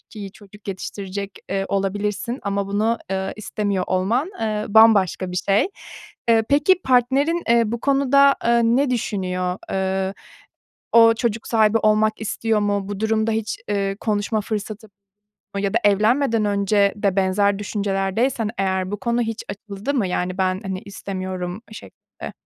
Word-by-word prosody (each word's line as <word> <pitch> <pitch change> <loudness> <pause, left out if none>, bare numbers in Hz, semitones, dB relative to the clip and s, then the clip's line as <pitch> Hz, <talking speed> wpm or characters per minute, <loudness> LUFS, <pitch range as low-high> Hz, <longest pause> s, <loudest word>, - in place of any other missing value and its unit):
iyi 200 -4 -10
çocuk 205 -1 -15
yetiştirecek, 195 +1 -6
eee, 195 0 0
olabilirsin 205 +5 -2
ama 200 -1 -1
bunu, 215 +4 0
eee, 190 0 -2
istemiyor 205 -3 -2
olman, 225 - 0
eee, 215 -1 -1
bambaşka 205 -4 +4
bir - - -4
şey. 195 - +2 0.6
Eee, 225 -1 +4
peki, 295 +6 +4
partnerin, 265 +7 +2
eee, 235 0 +5
bu 230 +2 -3
konuda, 280 0 +4
eee, 235 0 +4
ne 255 +4 +2
düşünüyor? 185 -5 -2
Eee, 190 0 -1 0.8
o 230 0 +7
çocuk 225 -1 -2
sahibi 220 -1 +3
olmak 215 0 +2
istiyor 220 0 0
mu? 205 -1 -1
Bu 205 -1 -5
durumda 220 0 +1
hiç, 220 -1 -2
eee, 195 -1 0
konuşma 215 0 -1
fırsatı 215 +1 -5 0.7
ya 200 +1 -1
da - - +5
evlenmeden 220 +3 +3
önce 200 0 +2
de 200 -2 0
benzer 195 +1 +2
düşüncelerdeysen 205 +3 -1
eğer 190 -1 0
bu 205 - -2
konu 235 -1 0
hiç 225 0 -4
açıldı 200 +5 -5
mı? 230 -8 +1
Yani 180 +1 -2
ben, 185 0 0
hani, 190 -1 -4
istemiyorum 185 -1 -6
şeklinde. - - -11
205 Hz, 145 wpm, -21 LUFS, 195-225 Hz, 0.8 s, o